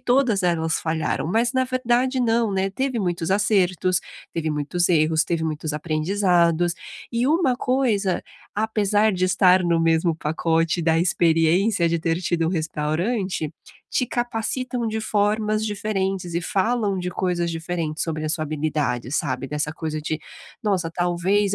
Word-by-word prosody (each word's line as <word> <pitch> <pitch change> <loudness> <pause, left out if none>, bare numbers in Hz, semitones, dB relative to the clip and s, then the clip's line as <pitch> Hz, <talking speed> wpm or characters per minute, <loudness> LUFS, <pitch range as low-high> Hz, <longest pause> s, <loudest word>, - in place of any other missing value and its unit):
todas 245 -6 +2
elas 165 -2 +1
falharam, 160 -1 -1
mas, 230 +5 +1
na 260 -1 +2
verdade, 255 0 +1
não, 230 -2 +2
né? 190 0 0
Teve 260 +3 -2
muitos 175 -3 -1
acertos, 185 -3 +2 0.3
teve 160 -1 -1
muitos 150 +4 0
erros, 160 -1 +3
teve 165 -2 -1
muitos 155 -1 -3
aprendizados. 170 +2 +1 0.4
E 235 +1 +1
uma 310 -5 +3
coisa, 230 -9 +1 0.3
apesar 215 0 +1
de 185 0 0
estar 185 0 +4
no 170 -1 +2
mesmo 165 +1 +2
pacote 165 +2 0
da 160 0 +3
experiência 170 +2 +2
de 165 0 0
ter 165 +1 0
tido 170 -2 0
um - - -1
restaurante, 165 +2 -2 0.4
te 250 - 0
capacitam 240 0 -2
de 220 0 -2
formas 215 0 0
diferentes 195 -4 -2
e 170 - +1
falam 205 0 0
de 180 0 -3
coisas 180 -1 -1
diferentes 165 -1 -3
sobre 155 -2 -3
a 155 - -1
sua 155 0 -1
habilidade, 145 -5 -2
sabe? 135 -4 -1
Dessa 150 +1 -2
coisa 155 -1 -4
de: 155 0 -2 0.4
"Nossa, 190 -7 0
talvez 180 +4 +1
180 Hz, 150 wpm, -23 LUFS, 160-215 Hz, 0.4 s, estar